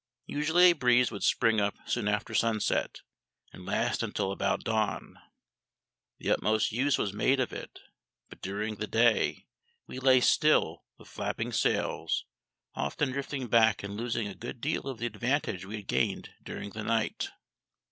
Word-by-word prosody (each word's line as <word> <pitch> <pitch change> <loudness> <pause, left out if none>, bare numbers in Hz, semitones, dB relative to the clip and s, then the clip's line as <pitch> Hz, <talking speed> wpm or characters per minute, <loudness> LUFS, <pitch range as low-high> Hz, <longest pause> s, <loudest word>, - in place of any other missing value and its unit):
Usually 165 +5 +4
a - - +2
breeze 125 -5 +3
would 100 - -6
spring 115 -3 +3
up 100 0 0
soon 105 - -1
after 105 0 -1
sunset, 115 -2 0 0.5
and - - -11
last - - 0
until 95 - -2
about 100 0 -1
dawn. 110 -1 -2 1.0
The - - -2
utmost 110 0 +2
use 130 +4 +2
was 100 - -1
made 130 +6 +2
of 130 - -1
it, - - -8 0.5
but - - -14
during 105 +3 -3
the 110 - -3
day 115 +1 +2 0.4
we 130 - -7
lay 130 -1 +5
still 125 - +3
with - - -16
flapping - - -3
sails, - - 0 0.5
often 130 - -1
drifting 135 0 -3
back 110 -3 +3
and 100 0 -5
losing 115 -1 -2
a 100 - -6
good 120 +6 -8
deal 145 +1 -2
of 135 -3 -4
the 115 - -3
advantage 120 -6 -1
we 105 +3 -6
had 105 -2 -8
gained - - 0
during 105 - -6
the 110 +2 -6
night. 115 0 -1
115 Hz, 160 wpm, -29 LUFS, 105-130 Hz, 1.0 s, lay